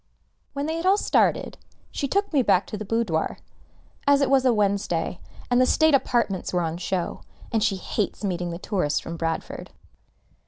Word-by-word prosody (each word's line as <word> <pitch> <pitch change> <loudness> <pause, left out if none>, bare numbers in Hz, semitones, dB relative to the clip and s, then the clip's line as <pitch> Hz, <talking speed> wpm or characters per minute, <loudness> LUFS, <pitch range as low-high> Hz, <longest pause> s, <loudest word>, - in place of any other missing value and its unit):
When 280 0 -2
they 320 +1 -2
had 330 - -4
all 390 +2 +5
started, - - +1 0.3
she 280 - -2
took 400 +3 0
me 280 - +4
back 185 -5 +3
to - - -6
the 215 - -5
boudoir, 205 -7 -1 0.7
as 285 0 +6
it 275 -2 +1
was 265 -1 +4
a 255 - +5
Wednesday, 200 -6 0 0.3
and 245 +1 +4
the - - +5
state 315 +2 +4
apartments 235 -8 +1
were 180 - +1
on 165 0 -2
show, 180 0 -3 0.3
and 225 -3 +1
she 210 -3 +2
hates 200 +3 -3
meeting 175 -3 -2
the 170 - -4
tourists 180 -6 -1
from 165 - -7
Bradford. 165 0 -4
210 Hz, 185 wpm, -25 LUFS, 175-275 Hz, 0.7 s, as